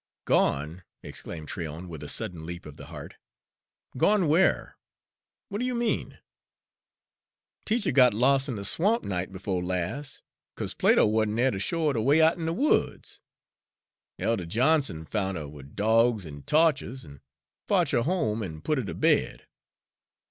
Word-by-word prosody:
"Gone!" 75 +6 +1 0.2
exclaimed 80 -3 -8
Tryon, 80 0 -6
with 80 -4 -8
a 75 - -6
sudden 85 -3 -4
leap 85 +1 -7
of 75 - -10
the - - -11
heart. - - -10 0.8
"Gone 195 +6 +3
where? 165 +6 +2 0.7
What 205 0 -4
do - - -1
you 255 -1 -1
mean?" 235 -1 -2 1.5
"Teacher 220 -4 +1
got 130 -2 +6
los' 135 +5 +2
in 125 - -3
de 100 -1 -5
swamp, 205 - +1
night 95 -1 -3
befo' 95 0 -3
las', 90 +11 -4 0.3
'cause - - -3
Plato - - +4
wa'n't 110 0 +1
dere 130 +2 +3
ter 95 - -4
show 165 - -1
her - - 0
de 115 - -1
way 140 +7 +4
out'n 160 +1 +3
de 165 - 0
woods. 285 - 0 1.0
Elder 105 -7 -1
Johnson 125 - +1
foun' 95 0 -2
'er 75 -2 -6
wid 70 -1 -13
dawgs 110 -1 +2
and 70 -2 -10
tawches, 145 -5 +2
an' 70 -1 -14 0.5
fotch - - +2
her 120 - +2
home 115 - 0
an' 80 -6 -6
put 150 -3 0
her - - -2
ter 100 - -6
bed. - - +1
110 Hz, 160 wpm, -27 LUFS, -, 1.5 s, got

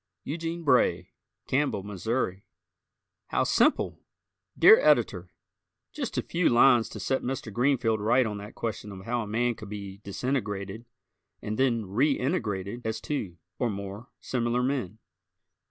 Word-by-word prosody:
Eugene 165 +3 -4
Bray, 130 -5 +2 0.3
Campbell, 130 -7 0
Mo. 105 0 -7 1.3
How - - +1
Simple! - - +2 0.6
Dear 445 +2 +8
Editor: - - +2 0.6
Just 275 -6 -4
a - - +1
few 170 0 +1
lines 120 -1 +5
to - - -8
set 135 - 0
Mr. 125 -4 -4
Greenfeld 120 -2 +2
right 120 +5 +3
on 105 -2 -4
that 105 +2 -10
question 105 -2 -4
of 95 -1 -10
how 120 +1 -1
a 110 - -5
man 120 +3 +1
could 110 -3 -10
be 100 -2 -7
disintegrated 105 -1 -3 0.5
and 105 - -4
then 120 -4 +2
reintegrated 120 - -1
as 110 0 -2
two 105 - -4 0.2
(or 120 - +1
more) 100 +3 -6
similar 120 0 -1
men. 125 -7 -2
115 Hz, 140 wpm, -28 LUFS, 105-135 Hz, 1.3 s, Dear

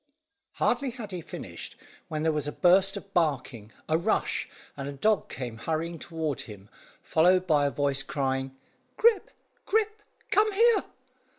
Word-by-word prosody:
Hardly 275 - +1
had 235 -4 -8
he 180 -2 -4
finished, - - -8 0.3
when 155 0 -3
there 160 - +3
was 150 -2 -2
a - - -2
burst 190 +4 +4
of 200 0 -11
barking, 130 -9 -1 0.2
a 160 +1 +2
rush, - - 0 0.3
and 140 0 -5
a - - -5
dog 210 +9 +1
came 120 -4 -6
hurrying 165 +5 -3
toward 160 -5 -3
him, 105 -2 -11 0.3
followed 180 +3 +4
by 150 -4 +3
a - - +1
voice 140 -1 0
crying 135 -1 -2 0.4
"Grip, 455 -3 +4 0.4
Grip, 430 0 +1 0.3
come 430 +1 +4
here!" 460 +2 +4
160 Hz, 155 wpm, -28 LUFS, 140-200 Hz, 0.4 s, burst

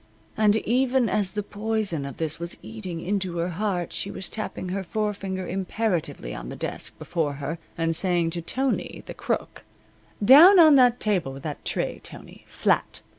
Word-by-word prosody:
And 215 -1 +4
even 250 +2 +2
as 205 -3 +1
the 210 -1 -2
poison 205 -7 -1
of 140 - -9
this 160 -1 -2
was 170 0 -3
eating 190 -7 -6
into 185 -2 -2
her 170 +1 -1
heart 180 -1 -2
she 200 - -3
was 190 - -5
tapping 215 -4 -5
her 195 +1 -2
forefinger 195 -2 -3
imperatively 185 - -2
on - - -7
the - - -6
desk - - -4
before 160 -4 -2
her 145 +4 -5 0.2
and 165 0 0
saying 175 -2 +2
to 170 - -4
Tony, 260 +10 -2
the - - -7
Crook: - - -3 0.6
"Down 325 - +9
on 315 -3 +8
the 250 -3 +6
table 185 -10 0
with 135 +1 -10
that 150 -2 -5
tray, - - -2
Tony - - -10
flat. - - 0
190 Hz, 175 wpm, -25 LUFS, 170-220 Hz, 0.6 s, Down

